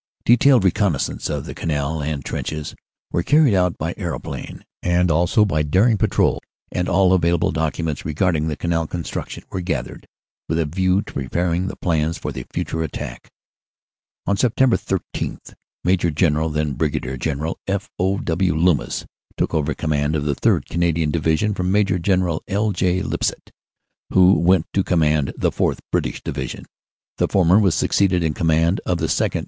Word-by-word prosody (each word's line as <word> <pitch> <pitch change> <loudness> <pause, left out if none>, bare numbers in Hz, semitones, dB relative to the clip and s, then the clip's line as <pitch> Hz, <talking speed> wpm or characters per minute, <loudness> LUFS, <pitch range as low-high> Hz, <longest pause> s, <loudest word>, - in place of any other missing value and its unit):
"Detailed 125 0 +5
reconnaissance 95 -4 0
of 75 -3 -3
the - - -6
Canal 75 0 -2
and 75 -2 -3
trenches 75 -1 -4 0.4
were 85 - +1
carried 145 - +4
out 90 -2 +2
by - - -3
aeroplane, - - -6 0.2
and 90 0 +2
also 85 +6 +3
by 80 -6 0
daring 95 +10 +3
patrols, 100 - +1 0.3
and 90 0 -1
all 95 0 +4
available 85 -2 +2
documents 80 -1 -2
regarding 80 0 0
the 75 - -2
Canal 80 +1 -1
construction 85 0 -5
were 95 - -3
gathered 90 -1 -4 0.4
with 80 - 0
a 85 - +1
view 95 +5 +1
to - - -12
preparing 85 +7 -1
the - - -5
plans 80 -1 0
for - - -5
the 65 - -7
future 80 - -3
attack. 80 -3 -6 1.0
"On 100 - +1
Sept. 125 +3 +3
13, - - -3 0.5
Maj. 90 -3 +1
General 80 -1 +2
(then 75 -1 -1
Brig. 65 -4 -2
General) 80 +2 -2
F. 100 0 -2
O. 95 +2 +1
W. 85 -1 0
Loomis 85 -1 +1 0.3
took - - -1
over 75 -2 0
command 75 0 0
of 75 -1 -1
the 75 - +1
3rd. - - +1
Canadian 85 -2 0
Division 80 +6 +1
from 90 -1 -1
Maj. 95 -3 +2
General 90 -3 +1
L. 105 +2 0
J. 90 0 0
Lipsett, - - -3 0.6
who 95 0 +6
went 90 -1 +3
to 95 - +2
command 75 -5 +2
the - - +1
4th. - - 0
(British) - - -1
Division; - - -5 0.5
the - - +3
former 95 +1 +4
was 95 -6 +3
succeeded 90 -3 +2
in 80 -2 0
command 80 +2 +1
of 90 - 0
the - - -1
2nd. - - 0
85 Hz, 165 wpm, -21 LUFS, 80-95 Hz, 1.0 s, who